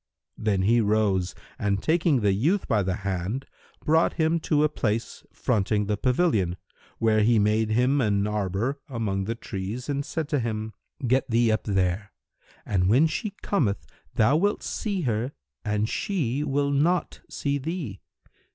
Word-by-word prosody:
Then 100 Hz, -3 st, +1 dB
he 115 Hz, +4 st, +4 dB
rose 100 Hz, -4 st, +1 dB, 0.2 s
and 100 Hz, -1 st, +1 dB
taking 160 Hz, -5 st, +2 dB
the 100 Hz, -2 st, +3 dB
youth 160 Hz, -, +1 dB
by 110 Hz, -4 st, +2 dB
the 95 Hz, -1 st, -1 dB
hand, 100 Hz, +7 st, -2 dB, 0.4 s
brought 160 Hz, +2 st, +3 dB
him 165 Hz, 0 st, +1 dB
to 150 Hz, -2 st, +2 dB
a -, -, +5 dB
place 115 Hz, -6 st, -2 dB
fronting 105 Hz, -2 st, 0 dB
the 105 Hz, +1 st, 0 dB
pavilion, 110 Hz, -, +1 dB, 0.4 s
where 110 Hz, -1 st, +3 dB
he 115 Hz, +2 st, +4 dB
made 105 Hz, +1 st, +2 dB
him 125 Hz, +5 st, +2 dB
an 100 Hz, -3 st, +2 dB
arbour[FN#321] 105 Hz, +5 st, -1 dB, 0.2 s
among 100 Hz, -4 st, -1 dB
the 115 Hz, +3 st, -2 dB
trees 110 Hz, +4 st, -5 dB
and 140 Hz, 0 st, -1 dB
said 160 Hz, 0 st, -3 dB
to 145 Hz, -, +1 dB
him, 110 Hz, -2 st, -3 dB, 0.3 s
"Get 130 Hz, +2 st, +2 dB
thee 115 Hz, 0 st, +3 dB
up 110 Hz, -, -1 dB
here, 95 Hz, 0 st, 0 dB, 0.6 s
and 95 Hz, -2 st, +1 dB
when 130 Hz, +9 st, +5 dB
she 200 Hz, +6 st, -2 dB
cometh 110 Hz, -, 0 dB, 0.3 s
thou 115 Hz, +8 st, +4 dB
wilt 205 Hz, +5 st, +1 dB
see 200 Hz, -4 st, -2 dB
her 120 Hz, -1 st, -1 dB, 0.3 s
and 105 Hz, 0 st, 0 dB
she 145 Hz, -, -1 dB
will 140 Hz, 0 st, 0 dB
not 165 Hz, +6 st, +1 dB
see 140 Hz, 0 st, -1 dB
thee. 145 Hz, -, -5 dB
115 Hz, 160 wpm, -26 LUFS, 105-145 Hz, 0.6 s, a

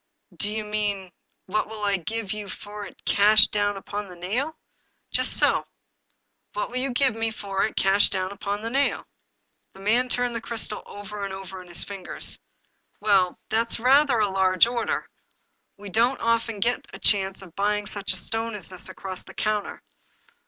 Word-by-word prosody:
" -, -, -51 dB
Do 205 Hz, -, -1 dB
you 215 Hz, 0 st, -2 dB
mean, 205 Hz, -3 st, -1 dB, 0.3 s
what 215 Hz, +3 st, -1 dB
will 220 Hz, -1 st, -7 dB
I 200 Hz, -1 st, +2 dB
give 215 Hz, +3 st, -3 dB
you 210 Hz, -2 st, -6 dB
for 205 Hz, +2 st, -7 dB
it -, -, -17 dB
cash 215 Hz, +1 st, +7 dB
down 205 Hz, -1 st, 0 dB
upon 205 Hz, +1 st, -5 dB
the 180 Hz, -, -10 dB
nail? 245 Hz, -, -2 dB, 0.2 s
" -, -, -44 dB
" -, -, -48 dB
Just -, -, +3 dB
so -, -, +3 dB, 0.4 s
— -, -, -49 dB
what -, -, -2 dB
will -, -, -3 dB
you 270 Hz, +1 st, +2 dB
give 255 Hz, -1 st, +2 dB
me 225 Hz, 0 st, +1 dB
for 200 Hz, -3 st, -1 dB
it -, -, -10 dB
cash 195 Hz, +1 st, +4 dB
down 185 Hz, 0 st, -2 dB
upon 200 Hz, +1 st, -3 dB
the 230 Hz, -, -3 dB
nail?" 275 Hz, +2 st, +2 dB, 0.7 s
The -, -, -14 dB
man 235 Hz, +6 st, +2 dB
turned 245 Hz, -1 st, +1 dB
the 230 Hz, -, -2 dB
crystal 225 Hz, -2 st, -3 dB
over 205 Hz, 0 st, -7 dB
and 200 Hz, -, -3 dB
over 190 Hz, -1 st, -7 dB
in 180 Hz, -, -14 dB
his 175 Hz, -, +1 dB
fingers. 195 Hz, -3 st, -6 dB, 0.3 s
" -, -, -44 dB
Well, 195 Hz, -4 st, +3 dB
that's 230 Hz, +1 st, +2 dB
rather 265 Hz, +1 st, +5 dB
a 215 Hz, -2 st, +3 dB
large 185 Hz, -1 st, +5 dB
order. 235 Hz, -1 st, -1 dB, 0.7 s
We 200 Hz, 0 st, -9 dB
don't 235 Hz, +7 st, +2 dB
often 230 Hz, -2 st, +1 dB
get 245 Hz, +3 st, +1 dB
a -, -, -8 dB
chance 195 Hz, -1 st, +2 dB
of 175 Hz, -4 st, -14 dB
buying 205 Hz, +1 st, +1 dB
such 205 Hz, -1 st, -3 dB
a 185 Hz, -, +1 dB
stone 225 Hz, +5 st, -2 dB
as 190 Hz, -5 st, -7 dB
this 185 Hz, -1 st, -6 dB
across 185 Hz, -1 st, -6 dB
the -, -, -13 dB
counter. 215 Hz, -1 st, -1 dB
210 Hz, 195 wpm, -25 LUFS, 195-230 Hz, 0.7 s, cash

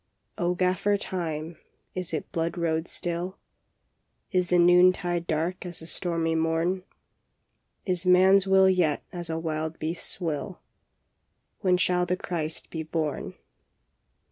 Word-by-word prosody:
" -, -, -40 dB
O 180 Hz, +1 st, +1 dB
Gaffer 185 Hz, +3 st, +2 dB
Time, 165 Hz, -4 st, -4 dB, 0.4 s
is 185 Hz, -2 st, -4 dB
it 155 Hz, -, -4 dB
blood 165 Hz, +1 st, -2 dB
road 160 Hz, -1 st, 0 dB
still? 175 Hz, +2 st, -3 dB, 0.9 s
Is 180 Hz, -2 st, +2 dB
the 180 Hz, -, +3 dB
noontide 175 Hz, 0 st, +4 dB
dark 165 Hz, +3 st, -1 dB
as 175 Hz, -2 st, -6 dB
the 160 Hz, -, -8 dB
stormy 165 Hz, -1 st, -1 dB
morn? 165 Hz, +3 st, +1 dB, 1.0 s
Is 180 Hz, -3 st, 0 dB
man 185 Hz, +1 st, +6 dB
s 195 Hz, 0 st, 0 dB
will 190 Hz, 0 st, +6 dB
yet 180 Hz, -6 st, +2 dB
as 175 Hz, -2 st, -5 dB
a 160 Hz, -, -1 dB
wild 160 Hz, 0 st, -3 dB
beast 165 Hz, +2 st, -3 dB
s -, -, -22 dB
will? 170 Hz, +2 st, -3 dB, 1.0 s
When 185 Hz, -2 st, +3 dB
shall 180 Hz, 0 st, +1 dB
the 180 Hz, +1 st, 0 dB
Christ 160 Hz, -4 st, -3 dB
be 160 Hz, -, -3 dB
born? 155 Hz, -2 st, -3 dB
175 Hz, 140 wpm, -27 LUFS, 160-180 Hz, 1.0 s, man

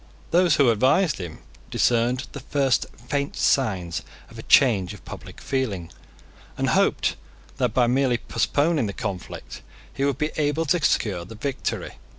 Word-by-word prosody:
Those 175 Hz, -2 st, +4 dB
who 135 Hz, -5 st, +5 dB
advised 130 Hz, -, +2 dB
him 85 Hz, -4 st, -7 dB, 0.3 s
discerned 120 Hz, +2 st, +1 dB
the 140 Hz, -, -7 dB
first 135 Hz, -1 st, +1 dB, 0.2 s
faint 140 Hz, +1 st, -1 dB
signs 95 Hz, -11 st, +1 dB, 0.3 s
of -, -, -11 dB
a -, -, -4 dB
change 105 Hz, -7 st, +4 dB
of 105 Hz, -, -16 dB
public -, -, -10 dB
feeling, 100 Hz, -, -2 dB, 0.7 s
and -, -, 0 dB
hoped -, -, +2 dB, 0.4 s
that, 110 Hz, -, 0 dB
by 125 Hz, -1 st, +5 dB
merely 125 Hz, 0 st, +2 dB
postponing 145 Hz, +1 st, +1 dB
the 100 Hz, -, -4 dB
conflict, 95 Hz, -2 st, -6 dB, 0.3 s
he 135 Hz, -, -2 dB
would 140 Hz, -2 st, +1 dB
be 150 Hz, +2 st, -1 dB
able 150 Hz, +1 st, +1 dB
to 160 Hz, +2 st, +1 dB
secure 95 Hz, -11 st, +1 dB
the 110 Hz, +6 st, -10 dB
victory. 135 Hz, +4 st, -4 dB
130 Hz, 155 wpm, -24 LUFS, 105-145 Hz, 0.7 s, who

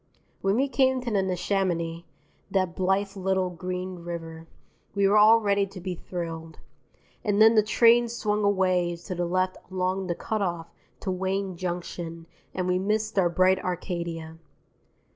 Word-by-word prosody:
When 195 Hz, +1 st, +2 dB
we 270 Hz, +4 st, +2 dB
came 260 Hz, -1 st, +2 dB
to 245 Hz, -1 st, -4 dB
the 200 Hz, -2 st, +2 dB
Neshaminy, 180 Hz, -3 st, -1 dB, 0.4 s
that 185 Hz, -3 st, 0 dB
blithe 195 Hz, +2 st, 0 dB
little 190 Hz, -1 st, 0 dB
green 180 Hz, +1 st, -5 dB
river, 165 Hz, -1 st, -7 dB, 0.5 s
we 200 Hz, -1 st, +3 dB
were 200 Hz, -, +3 dB
all 220 Hz, +2 st, +7 dB
ready 200 Hz, -2 st, +1 dB
to 190 Hz, -1 st, -10 dB
be 185 Hz, +1 st, -4 dB
thrilled. 165 Hz, -2 st, -6 dB, 0.7 s
And 205 Hz, -1 st, +1 dB
then 220 Hz, +1 st, +8 dB
the 215 Hz, -, +6 dB
train 235 Hz, +3 st, +5 dB
swung 210 Hz, -3 st, -1 dB
away 185 Hz, -3 st, +2 dB
to 175 Hz, +3 st, -7 dB
the 175 Hz, 0 st, -1 dB
left 185 Hz, +1 st, 0 dB
along 185 Hz, 0 st, -1 dB
the 175 Hz, -, -1 dB
cut 215 Hz, +4 st, -3 dB
off 170 Hz, -3 st, -3 dB, 0.3 s
to 190 Hz, -, -2 dB
Wayne 190 Hz, +1 st, -2 dB
Junction 170 Hz, -1 st, -5 dB, 0.3 s
and 185 Hz, -1 st, -2 dB
we 180 Hz, 0 st, +2 dB
missed 215 Hz, +1 st, 0 dB
our 175 Hz, -2 st, +3 dB
bright 185 Hz, +2 st, +3 dB
Arcadia. 170 Hz, -3 st, -4 dB
185 Hz, 160 wpm, -26 LUFS, 175-200 Hz, 0.7 s, then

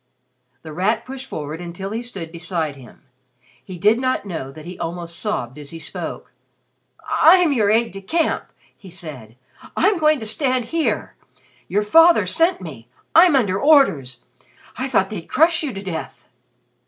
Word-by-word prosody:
The 160 Hz, -1 st, -9 dB
Rat 205 Hz, +7 st, 0 dB
pushed 265 Hz, 0 st, -8 dB
forward 155 Hz, +2 st, -6 dB
until 175 Hz, +3 st, -6 dB
he 225 Hz, +2 st, -3 dB
stood 195 Hz, -9 st, -7 dB
beside 165 Hz, -3 st, -3 dB
him. 130 Hz, -1 st, -16 dB, 0.6 s
He 185 Hz, +5 st, -9 dB
did 210 Hz, +6 st, +3 dB
not 255 Hz, -4 st, -1 dB
know 160 Hz, -8 st, -5 dB
that 155 Hz, +2 st, -12 dB
he 180 Hz, +1 st, -9 dB
almost 170 Hz, 0 st, -5 dB
sobbed 150 Hz, -, -3 dB
as 145 Hz, -1 st, -9 dB
he 165 Hz, -, -8 dB
spoke. 165 Hz, -, -6 dB, 0.8 s
"I'm 325 Hz, 0 st, +5 dB
your 215 Hz, -6 st, +2 dB
aide 225 Hz, +2 st, +3 dB
de 195 Hz, +1 st, -9 dB
camp," 325 Hz, -, -1 dB, 0.3 s
he 190 Hz, -, -14 dB
said. 145 Hz, -11 st, -9 dB, 0.4 s
"I'm 390 Hz, +1 st, +3 dB
going 305 Hz, -2 st, +3 dB
to 220 Hz, -, -6 dB
stand 255 Hz, +2 st, +1 dB
here! 325 Hz, +5 st, -1 dB, 0.5 s
Your 205 Hz, +1 st, 0 dB
father 330 Hz, +10 st, +6 dB
sent 335 Hz, -, +1 dB
me! 135 Hz, -10 st, -9 dB, 0.3 s
I'm 335 Hz, -1 st, +7 dB
under 200 Hz, -7 st, +1 dB
orders! 150 Hz, -, +3 dB, 0.5 s
I 260 Hz, -, -3 dB
thought 195 Hz, -6 st, +1 dB
they'd 185 Hz, -6 st, -7 dB
crush 325 Hz, +2 st, +3 dB
you 300 Hz, -4 st, -3 dB
to 195 Hz, -2 st, -7 dB
death." 170 Hz, -5 st, -6 dB
200 Hz, 165 wpm, -21 LUFS, 165-270 Hz, 0.8 s, I'm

